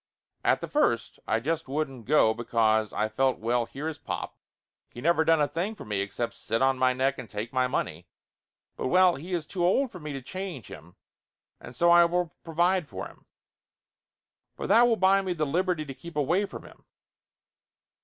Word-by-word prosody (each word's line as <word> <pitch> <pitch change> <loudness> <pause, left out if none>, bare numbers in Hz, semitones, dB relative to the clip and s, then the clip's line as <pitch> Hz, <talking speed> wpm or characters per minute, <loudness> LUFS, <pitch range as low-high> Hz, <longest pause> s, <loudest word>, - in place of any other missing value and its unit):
At - - +2
the - - -4
first - - 0
I 115 - +1
just 160 +5 -2
wouldn't 135 -4 -3
go 130 -5 +4
because 110 -2 +1
I 105 - 0
felt 130 +4 +1
well 115 +1 0
here 140 +6 -6
is 160 - -5
pop, - - -5 0.5
he - - -11
never 160 +4 +3
done 165 0 +4
a 145 - +3
thing 185 +9 -3
for - - -10
me 105 -2 -1
except 115 +4 -3
sit 115 -1 -2
on 135 -1 +2
my 130 0 +4
neck 130 +2 0
and 125 - -8
take 110 +4 -5
my 130 -1 +2
money, 85 -8 -3 0.7
but - - -3
well 185 +4 +5
he 170 +7 -9
is 165 -3 -3
too 175 +3 -3
old 230 +9 +2
for 180 - -9
me 150 -2 -6
to 135 - -4
change 185 - -6
him, 85 +3 -12 0.6
and 120 - -11
so 170 +6 +4
I 170 0 +7
will 175 -1 -1
provide 175 +1 +1
for 95 -1 -6
him. - - -15 1.3
But - - -5
that 240 +2 +6
will 235 - +3
buy 195 +1 +4
me 185 -2 -2
the 155 -3 -1
liberty 170 +1 0
to 135 - -7
keep 165 +5 -11
away 165 +8 +1
from - - -9
him. - - -16
145 Hz, 200 wpm, -27 LUFS, 120-175 Hz, 1.3 s, I